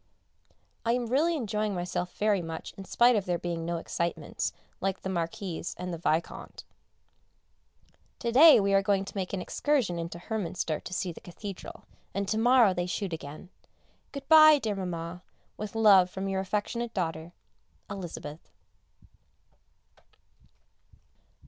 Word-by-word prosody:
I 230 Hz, -, +2 dB
am 245 Hz, 0 st, 0 dB
really 295 Hz, +8 st, +2 dB
enjoying 210 Hz, -4 st, -2 dB
myself 180 Hz, 0 st, -3 dB
very 210 Hz, -3 st, +2 dB
much 165 Hz, -1 st, -6 dB
in 195 Hz, -, -9 dB
spite 240 Hz, +5 st, +4 dB
of 200 Hz, -3 st, 0 dB
there 175 Hz, -1 st, 0 dB
being 170 Hz, -1 st, -4 dB
no 170 Hz, 0 st, -2 dB
excitements, 170 Hz, +1 st, -3 dB, 0.3 s
like 195 Hz, 0 st, -1 dB
the 190 Hz, -, -4 dB
Marquis 180 Hz, 0 st, -3 dB
and 180 Hz, 0 st, -5 dB
the 165 Hz, -, -5 dB
Vicomte. 160 Hz, 0 st, -2 dB, 1.5 s
To 235 Hz, -, -2 dB
day 300 Hz, +4 st, +9 dB
we 200 Hz, -1 st, +1 dB
are 195 Hz, -, +5 dB
going 195 Hz, -1 st, +1 dB
to -, -, -10 dB
make 190 Hz, -2 st, -3 dB
an 195 Hz, -, -3 dB
excursion 255 Hz, -13 st, 0 dB
into 170 Hz, 0 st, -5 dB
Hernminster 175 Hz, -5 st, -3 dB
to -, -, -7 dB
see 185 Hz, 0 st, -2 dB
the -, -, -12 dB
Cathedral, 195 Hz, +2 st, -9 dB, 0.3 s
and 200 Hz, 0 st, -1 dB
to 220 Hz, -, 0 dB
morrow 240 Hz, -3 st, +5 dB
they 175 Hz, 0 st, -2 dB
shoot 185 Hz, 0 st, -3 dB
again. 155 Hz, +2 st, -8 dB, 0.6 s
Good 280 Hz, -1 st, -8 dB
bye, 310 Hz, -1 st, +9 dB
dear 220 Hz, -6 st, -2 dB
Mamma, 180 Hz, -2 st, -5 dB, 0.3 s
with 210 Hz, 0 st, -6 dB
love 200 Hz, -5 st, +6 dB
from 190 Hz, +1 st, -4 dB
your 190 Hz, 0 st, -1 dB
affectionate 215 Hz, +4 st, -3 dB
daughter, 165 Hz, -2 st, -3 dB, 0.5 s
Elizabeth. 170 Hz, -6 st, -7 dB
195 Hz, 145 wpm, -29 LUFS, 175-220 Hz, 1.5 s, day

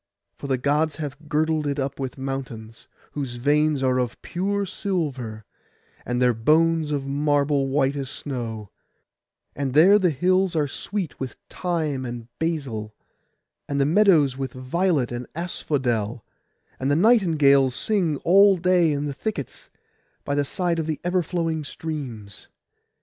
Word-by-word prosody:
For 140 Hz, -, -8 dB
the 135 Hz, -1 st, +1 dB
Gods 145 Hz, +4 st, +1 dB
have 150 Hz, 0 st, -7 dB
girdled 155 Hz, 0 st, +1 dB
it 140 Hz, -1 st, -2 dB
with 130 Hz, 0 st, -4 dB
mountains, 125 Hz, -3 st, -6 dB, 0.2 s
whose 135 Hz, -4 st, -4 dB
veins 145 Hz, +2 st, +2 dB
are 130 Hz, -1 st, +2 dB
of 125 Hz, -2 st, -2 dB
pure 200 Hz, +3 st, -1 dB
silver, 135 Hz, -, -3 dB, 0.6 s
and 125 Hz, 0 st, -1 dB
their 125 Hz, -1 st, +4 dB
bones 155 Hz, +6 st, +2 dB
of 145 Hz, -2 st, -2 dB
marble 145 Hz, 0 st, +1 dB
white 135 Hz, 0 st, +1 dB
as 135 Hz, -2 st, -4 dB
snow; 115 Hz, -8 st, -6 dB, 0.8 s
and 135 Hz, -1 st, -3 dB
there 190 Hz, +7 st, +7 dB
the 185 Hz, -3 st, +3 dB
hills 185 Hz, +4 st, +1 dB
are 150 Hz, -2 st, +1 dB
sweet 185 Hz, +5 st, -4 dB
with 130 Hz, -2 st, -5 dB, 0.2 s
thyme 160 Hz, -7 st, -2 dB
and 120 Hz, -2 st, -6 dB
basil, 130 Hz, -10 st, -3 dB, 0.7 s
and 140 Hz, 0 st, -1 dB
the 140 Hz, -, +3 dB
meadows 160 Hz, -6 st, +4 dB
with 135 Hz, -2 st, -4 dB
violet 135 Hz, +1 st, 0 dB
and 120 Hz, 0 st, -5 dB
asphodel, 125 Hz, -, -2 dB, 0.5 s
and 130 Hz, -, -1 dB
the 145 Hz, -, +3 dB
nightingales 155 Hz, -, +4 dB
sing 180 Hz, -7 st, +1 dB
all 195 Hz, +2 st, +6 dB
day 180 Hz, -2 st, +3 dB
in 145 Hz, 0 st, -1 dB
the 145 Hz, -, -3 dB
thickets, 140 Hz, -, -5 dB, 0.6 s
by 140 Hz, -, -1 dB
the 145 Hz, 0 st, +2 dB
side 175 Hz, +2 st, -1 dB
of 160 Hz, 0 st, -3 dB
ever 180 Hz, +1 st, +1 dB
flowing 165 Hz, -2 st, -2 dB
streams. 130 Hz, -10 st, -7 dB
145 Hz, 145 wpm, -24 LUFS, 130-165 Hz, 0.8 s, there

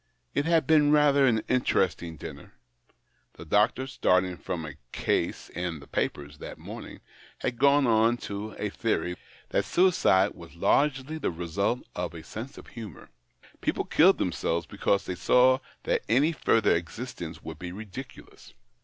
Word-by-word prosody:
It 145 Hz, -, 0 dB
had 165 Hz, -1 st, +3 dB
been 150 Hz, -2 st, +5 dB
rather 145 Hz, -2 st, +5 dB
an 110 Hz, -3 st, +2 dB
interesting 95 Hz, -9 st, 0 dB
dinner. -, -, -10 dB, 0.8 s
The -, -, -11 dB
doctor, 105 Hz, +9 st, +2 dB
starting 90 Hz, -8 st, +1 dB
from 85 Hz, -2 st, -5 dB
a 75 Hz, -1 st, -9 dB
case -, -, -1 dB
in 90 Hz, -3 st, -4 dB
the 70 Hz, -, -13 dB
papers 70 Hz, +1 st, -3 dB
that -, -, -8 dB
morning, -, -, -9 dB, 0.4 s
had 120 Hz, -, -3 dB
gone 140 Hz, +1 st, +5 dB
on 115 Hz, 0 st, +3 dB
to 105 Hz, +2 st, -5 dB
a -, -, -3 dB
theory 90 Hz, 0 st, -1 dB, 0.3 s
that -, -, +1 dB
suicide 105 Hz, -, +3 dB
was 85 Hz, -1 st, -13 dB
largely 140 Hz, -, +1 dB
the -, -, 0 dB
result 90 Hz, +8 st, -1 dB
of 90 Hz, -1 st, -3 dB
a 80 Hz, -, -8 dB
sense 120 Hz, +5 st, -8 dB
of -, -, -11 dB
humour. 110 Hz, -, -10 dB, 0.5 s
People -, -, -1 dB
killed -, -, +5 dB
themselves 85 Hz, +1 st, -1 dB
because 100 Hz, -1 st, 0 dB
they 90 Hz, -, -3 dB
saw 125 Hz, +7 st, +4 dB, 0.2 s
that -, -, +1 dB
any 140 Hz, +8 st, +4 dB
further 115 Hz, -8 st, +3 dB
existence 85 Hz, -1 st, -6 dB
would 80 Hz, -1 st, -8 dB
be 90 Hz, -1 st, -6 dB
ridiculous. 110 Hz, +6 st, -10 dB
105 Hz, 155 wpm, -27 LUFS, 90-130 Hz, 0.8 s, been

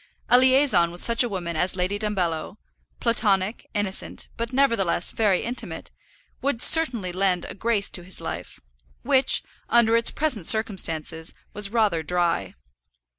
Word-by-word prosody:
A 245 Hz, -, +6 dB
liaison 260 Hz, -9 st, +3 dB
with 175 Hz, +1 st, -6 dB
such 230 Hz, +4 st, +4 dB
a 245 Hz, -, +1 dB
woman 175 Hz, -4 st, -5 dB
as 180 Hz, +4 st, -1 dB
Lady 185 Hz, +2 st, -2 dB
Dumbello, 180 Hz, -7 st, -3 dB, 0.4 s
platonic, 210 Hz, -2 st, 0 dB
innocent, 205 Hz, -2 st, -4 dB
but 230 Hz, 0 st, -5 dB
nevertheless 230 Hz, -10 st, +1 dB
very 205 Hz, -5 st, 0 dB
intimate, 245 Hz, +2 st, -6 dB, 0.5 s
would 265 Hz, -3 st, -1 dB
certainly 240 Hz, -, +4 dB
lend 185 Hz, -1 st, -1 dB
a -, -, -7 dB
grace 215 Hz, -1 st, 0 dB
to 175 Hz, -, 0 dB
his 185 Hz, +2 st, -5 dB
life, -, -, -7 dB, 0.4 s
which, 265 Hz, 0 st, +2 dB, 0.3 s
under 235 Hz, -1 st, +3 dB
its 230 Hz, 0 st, +3 dB
present 255 Hz, -, -2 dB
circumstances, 165 Hz, -7 st, +1 dB, 0.2 s
was 205 Hz, -1 st, -1 dB
rather 210 Hz, -7 st, 0 dB
dry. 170 Hz, -, -2 dB
205 Hz, 140 wpm, -23 LUFS, 180-235 Hz, 0.5 s, A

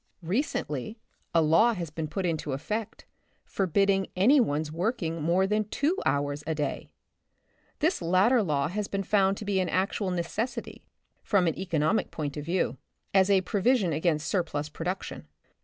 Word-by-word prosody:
Recently 185 Hz, -, -2 dB, 0.3 s
a 165 Hz, -1 st, +4 dB
law 165 Hz, +10 st, +4 dB
has 170 Hz, -5 st, -5 dB
been 155 Hz, 0 st, -4 dB
put 185 Hz, +5 st, -3 dB
into 160 Hz, -4 st, -2 dB
effect, 210 Hz, +10 st, -4 dB, 0.4 s
forbidding 195 Hz, +1 st, +1 dB
any 240 Hz, +11 st, +5 dB
one's 150 Hz, -, 0 dB
working 165 Hz, -2 st, -2 dB
more 175 Hz, +5 st, +2 dB
than 210 Hz, +2 st, +1 dB
two 300 Hz, -, +1 dB
hours 145 Hz, +1 st, 0 dB
a 160 Hz, -, 0 dB
day. 145 Hz, -2 st, -3 dB, 0.9 s
This 325 Hz, -, +1 dB
lat 185 Hz, +5 st, +3 dB
ter 250 Hz, -2 st, +4 dB
law 150 Hz, -7 st, 0 dB
has 205 Hz, +5 st, -3 dB
been 195 Hz, 0 st, -2 dB
found 195 Hz, 0 st, +2 dB
to 210 Hz, -, -7 dB
be 200 Hz, -2 st, +1 dB
an 185 Hz, -, 0 dB
actual 195 Hz, +1 st, 0 dB
neces 210 Hz, +8 st, -2 dB
sity, -, -, -11 dB, 0.4 s
from 195 Hz, -4 st, +2 dB
an 165 Hz, -, +1 dB
economic 170 Hz, 0 st, 0 dB
point 145 Hz, -3 st, -4 dB
of 150 Hz, -, -4 dB
view, 170 Hz, +4 st, -1 dB, 0.4 s
as 190 Hz, 0 st, +4 dB
a 195 Hz, -1 st, +5 dB
pro 200 Hz, +1 st, -2 dB
vision 210 Hz, -7 st, +3 dB
against 155 Hz, 0 st, 0 dB
surplus 150 Hz, -4 st, -1 dB
production. 165 Hz, -, -5 dB
185 Hz, 170 wpm, -28 LUFS, 155-205 Hz, 0.9 s, any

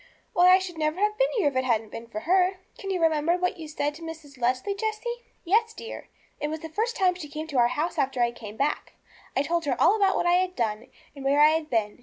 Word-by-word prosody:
Why, 360 Hz, +1 st, +6 dB
I 370 Hz, -, +8 dB
should 365 Hz, -3 st, -6 dB
never 310 Hz, +3 st, 0 dB
have 420 Hz, +1 st, +2 dB
been -, -, +2 dB
here 390 Hz, -, +3 dB
if 275 Hz, -, -12 dB
it 260 Hz, -, +2 dB
hadn't 225 Hz, -4 st, 0 dB
been 230 Hz, +1 st, -8 dB
for 215 Hz, -2 st, -6 dB
her.' 370 Hz, -, +3 dB, 0.2 s
'Can 390 Hz, -, -6 dB
you 375 Hz, -2 st, 0 dB
remember 325 Hz, +1 st, +2 dB
what 360 Hz, +1 st, -1 dB
you 320 Hz, -2 st, -8 dB
said 295 Hz, -1 st, -2 dB
to 315 Hz, -, -13 dB
Mrs. 320 Hz, -4 st, -9 dB
Leslie, 255 Hz, +11 st, 0 dB
Jessie?' 440 Hz, +3 st, -3 dB, 0.2 s
'Yes, 445 Hz, +5 st, +2 dB
dear. 460 Hz, -, -8 dB, 0.3 s
It 295 Hz, -, -1 dB
was 310 Hz, +1 st, -5 dB
the 320 Hz, -, -7 dB
first 450 Hz, +8 st, -1 dB
time 370 Hz, -2 st, +3 dB
she 345 Hz, -5 st, -9 dB
came 305 Hz, +1 st, -5 dB
to 275 Hz, -4 st, 0 dB
our 240 Hz, -, +5 dB
house 305 Hz, +7 st, -2 dB
after 265 Hz, -1 st, 0 dB
I 240 Hz, 0 st, +3 dB
came 220 Hz, -2 st, -10 dB
back. 285 Hz, +2 st, -1 dB, 0.4 s
I 275 Hz, -, +2 dB
told 340 Hz, +1 st, -1 dB
her 260 Hz, -4 st, -1 dB
all 410 Hz, -, +5 dB
about 395 Hz, -3 st, +3 dB
what -, -, 0 dB
I 350 Hz, +1 st, +4 dB
had 370 Hz, 0 st, 0 dB
done, 220 Hz, -1 st, -2 dB, 0.3 s
and 275 Hz, -, -9 dB
where 280 Hz, +2 st, +2 dB
I 300 Hz, -, +8 dB
had 315 Hz, 0 st, -1 dB
been. 215 Hz, -2 st, -1 dB
320 Hz, 265 wpm, -26 LUFS, 270-370 Hz, 0.4 s, I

